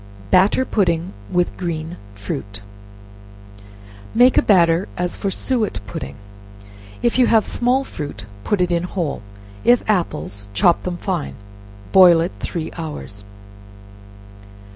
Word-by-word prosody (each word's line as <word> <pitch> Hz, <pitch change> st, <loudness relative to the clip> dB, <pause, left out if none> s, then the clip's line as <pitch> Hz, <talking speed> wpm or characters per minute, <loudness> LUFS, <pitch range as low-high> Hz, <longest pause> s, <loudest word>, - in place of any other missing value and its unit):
Batter 200 Hz, +8 st, +4 dB
Pudding 175 Hz, -6 st, 0 dB, 0.2 s
with 175 Hz, 0 st, 0 dB
Green 165 Hz, -2 st, -4 dB, 0.2 s
Fruit. 100 Hz, 0 st, -6 dB, 1.5 s
Make 245 Hz, +2 st, +6 dB
a -, -, +6 dB
batter 170 Hz, -2 st, +3 dB
as 180 Hz, 0 st, -2 dB
for 200 Hz, -, -2 dB
suet 220 Hz, -, -1 dB
pudding. 70 Hz, -9 st, -7 dB, 0.9 s
If 240 Hz, +1 st, +2 dB
you 250 Hz, -, +5 dB
have 220 Hz, -2 st, +4 dB
small 250 Hz, +3 st, +1 dB
fruit, 145 Hz, -, -7 dB, 0.2 s
put 205 Hz, -, 0 dB
it 180 Hz, -1 st, +1 dB
in 170 Hz, -1 st, +1 dB
whole; 175 Hz, -, -3 dB, 0.4 s
if 245 Hz, 0 st, +3 dB
apples, 100 Hz, -, -2 dB
chop 170 Hz, -, +4 dB
them 180 Hz, -1 st, -4 dB
fine; 180 Hz, -5 st, -3 dB, 0.6 s
boil 180 Hz, -3 st, +7 dB
it 170 Hz, +3 st, -1 dB
three 165 Hz, -3 st, -4 dB
hours. 150 Hz, -10 st, -5 dB
175 Hz, 120 wpm, -20 LUFS, 155-205 Hz, 1.5 s, boil